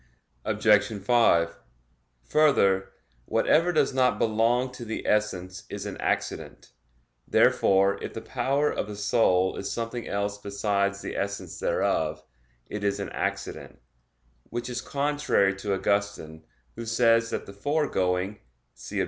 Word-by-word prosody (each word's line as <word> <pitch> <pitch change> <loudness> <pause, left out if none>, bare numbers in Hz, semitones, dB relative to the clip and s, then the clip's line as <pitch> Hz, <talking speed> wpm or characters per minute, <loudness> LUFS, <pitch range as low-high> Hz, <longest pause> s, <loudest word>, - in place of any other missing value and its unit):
Obj. 105 -2 +4
5: 100 - +2 0.6
Further, 100 - +3 0.3
whatever 165 - +3
does 155 - +2
not 130 -1 +2
belong 115 +3 +1
to 125 - -9
the 110 -1 -5
essence 95 -4 -1
is 100 0 -6
an 100 - -5
accident. - - -3 0.6
Therefore 100 +1 +3
if - - -6
the 115 - -4
power 135 +5 0
of - - -3
the 105 - -6
soul 100 -3 +2
is 100 - -4
something 115 0 -4
else 100 0 -2
besides 100 0 -1
the - - -5
essence 100 0 -4
thereof, 75 -1 0 0.4
it 105 -1 -6
is 100 -1 0
an - - -4
accident, - - -4 0.7
which 120 +1 -5
is 125 0 -3
contrary 145 -8 +1
to 100 0 -1
Augustine, 95 -6 -2 0.3
who 115 0 -7
says 115 0 +3
that - - -3
the 100 - -10
foregoing 100 -6 0 0.3
(see - - -8
Obj. - - +2
105 Hz, 135 wpm, -26 LUFS, 100-120 Hz, 0.7 s, Obj